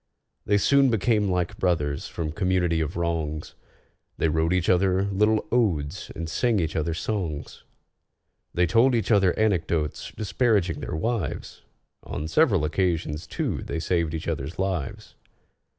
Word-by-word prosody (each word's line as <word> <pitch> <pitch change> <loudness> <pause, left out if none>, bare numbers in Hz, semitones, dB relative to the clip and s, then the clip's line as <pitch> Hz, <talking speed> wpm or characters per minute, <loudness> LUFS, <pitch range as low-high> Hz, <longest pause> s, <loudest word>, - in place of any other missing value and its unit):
They 105 - +4
soon 140 +6 +4
became 110 -2 +2
like 90 -1 -1
brothers 75 -6 0
from 80 -2 -4
community 90 -2 +1
of 80 +2 -3
wrongs: 80 -3 -2 0.6
They 80 - +1
wrote 80 +2 +1
each 90 -2 +1
other 95 +1 +3
little 105 +2 +2
odes 90 -8 0
and 85 0 -4
sang 115 +5 +1
each 80 -3 -2
other 80 +1 -1
songs; 85 -7 -4 0.9
They 90 - +2
told 115 +8 +4
each 115 0 0
other 95 -4 +4
anecdotes 85 -8 0
disparaging 105 -1 +1
their - - -4
wives; 105 - -3 0.4
On 75 - -5
several 100 - +3
occasions, 80 -2 -1
too, - - -2
they 80 - -4
saved 85 -1 0
each 80 - -5
other's 75 -1 -3
lives. 95 -7 -3
90 Hz, 140 wpm, -25 LUFS, 80-105 Hz, 0.9 s, They